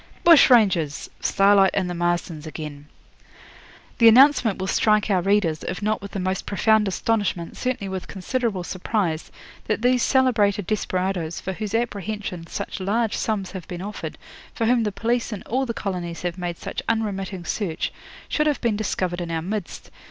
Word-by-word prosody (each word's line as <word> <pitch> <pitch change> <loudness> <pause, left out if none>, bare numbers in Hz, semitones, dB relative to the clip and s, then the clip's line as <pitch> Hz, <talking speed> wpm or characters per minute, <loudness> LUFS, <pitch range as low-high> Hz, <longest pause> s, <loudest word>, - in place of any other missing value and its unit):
'BUSH 335 -5 +8
RANGERS! 190 - +3
'STARLIGHT 195 -1 +4
AND 185 -2 +1
THE 175 - -3
MARSTONS 175 -2 -2
AGAIN. 150 -2 -7 1.1
'The 230 - +7
announcement 250 -2 +6
will 190 - -3
strike 210 +2 +2
our 185 -2 +3
readers, 190 -5 +1
if - - -4
not 215 +1 0
with 200 - -7
the 195 - -3
most 185 0 -2
profound 215 +1 +3
astonishment, 195 -3 -1
certainly 250 -5 -2
with 190 -1 -5
considerable 205 -1 -2
surprise, 180 -2 -2 0.4
that 215 +1 -1
these 250 0 +3
celebrated 220 -8 +2
desperadoes, 185 -5 -2
for 190 - -4
whose 215 +2 -4
apprehension 205 -6 -3
such - - -5
large 220 +4 0
sums 205 -4 -2
have 190 -3 -8
been 180 -1 -6
offered, 210 +1 -6 0.4
for 230 - 0
whom 240 +1 +3
the 210 -2 0
police 230 +4 -1
in 210 - -6
all 260 +3 -1
the - - -1
colonies 180 -6 -4
have 175 -1 -2
made 175 -2 -4
such - - -5
unremitting 195 -5 -2
search, 170 -3 -2 0.3
should 300 0 +1
have 295 -3 +1
been 230 -3 0
discovered 185 -4 -2
in 170 - -4
our 165 -1 -2
midst. 200 +1 -5
200 Hz, 170 wpm, -23 LUFS, 180-225 Hz, 1.1 s, BUSH